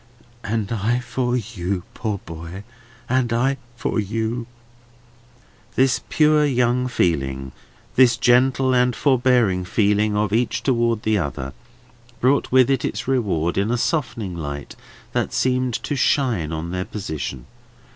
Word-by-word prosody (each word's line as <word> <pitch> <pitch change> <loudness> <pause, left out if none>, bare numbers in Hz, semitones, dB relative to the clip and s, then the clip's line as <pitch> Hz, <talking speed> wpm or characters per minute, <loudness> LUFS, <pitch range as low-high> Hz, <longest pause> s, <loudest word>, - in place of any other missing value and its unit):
"And 110 -1 -2
I 115 +2 +1
for 125 0 -1
you, 100 -5 -3
poor 110 -3 -2
boy! 85 +3 -8 0.4
And 130 -2 +1
I 130 +4 +1 0.2
for 120 - -1
you!" 110 +3 -2 1.3
This 130 0 +3
pure 150 -1 +4
young 125 -2 +2
feeling, 65 - -1 0.4
this 125 -2 +5
gentle 130 +2 +3
and 125 -1 +3
forbearing 125 -8 +2
feeling 105 +2 +1
of 105 -1 0
each 120 +2 0
towards 115 -4 +1
the 110 -1 +2
other, 70 -4 -4 0.7
brought 135 +3 +2
with 130 0 +5
it 135 -3 +1
its 115 +3 -3
reward 95 -10 0
in 100 +3 0
a 120 - +1
softening 115 - -1
light 70 -3 -6 0.4
that - - -1
seemed 130 -2 +1
to 145 - -2
shine 125 - +1
on 80 +1 -4
their 90 0 -2
position. 75 - -5
115 Hz, 135 wpm, -22 LUFS, 95-125 Hz, 1.3 s, this